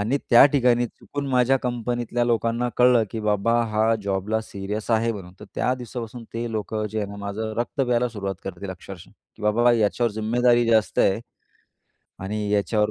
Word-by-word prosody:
आणि 115 +7 0
त्या 120 +1 +9
ठिकाणी 120 -3 +3
चुकून 145 +4 -7
माझ्या 130 0 +3
कंपनीतल्या 120 0 -1
लोकांना 115 +1 0
कळलं, 125 -2 +5
की 115 - -4
बाबा 105 +1 +1 0.2
हा 110 +1 +2
जॉबला 100 +2 -1
सीरियस 105 +1 -5
आहे 115 +1 +2
म्हणून, 95 -4 -9
तर - - -8
त्या 125 - +1
दिवसापासून 120 -1 -7
ते 115 0 -3
लोकं 110 0 -2
जे 110 - -3
आहे 105 -2 -2
ना, 100 - -8
माझं 100 +2 -4
रक्त 120 +4 -2
प्यायला 125 -1 +2
सुरुवात 100 -4 -4
करतील 95 0 -6
अक्षरशः 95 0 -10 0.3
की - - -14
बाबा 120 +3 +3
याच्यावर 115 +1 +1
जिम्मेदारी 120 +3 +2
जास्त 110 -2 +2
आहे. 95 +3 +3 1.0
आणि 105 +1 -3
याच्यावर 105 +1 +1
110 Hz, 170 wpm, -24 LUFS, 105-120 Hz, 1.0 s, त्या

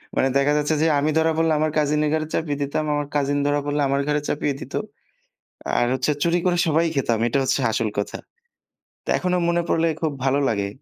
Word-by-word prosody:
মানে 130 - +2
দেখা 140 +1 +2
যাচ্ছে 150 +1 +1
যে 165 - +3
আমি 150 +2 +1
ধরা 160 0 +3
পড়লে 165 -1 +2
আমার 155 0 +1
কাজিনের 150 0 +1
ঘরে 155 -1 -1
চাপিয়ে 145 -3 -1
দিতাম। 145 +2 -2
আমার 145 -1 -2
কাজিন 145 0 +1
ধরা 145 0 +1
পড়লে 145 0 -1
আমার 140 0 +1
ঘরে 150 0 +1
চাপিয়ে 145 -1 -1
দিত। 135 - -10 1.0
আর 120 - +2
হচ্ছে 130 +3 0
চুরি 170 +1 +2
করে 175 -1 +2
সবাই 160 +2 +2
খেতাম। 120 -4 0
এটা 120 - 0
হচ্ছে 130 - +1
আসল 110 0 0
কথা। 100 - -3 0.9
তা - - -8
এখনো 180 0 0
মনে 170 0 +2
পড়লে 165 0 +2
খুব 160 - 0
ভালো 135 +1 +2
লাগে। 100 -3 -1
145 Hz, 205 wpm, -22 LUFS, 140-160 Hz, 1.0 s, যে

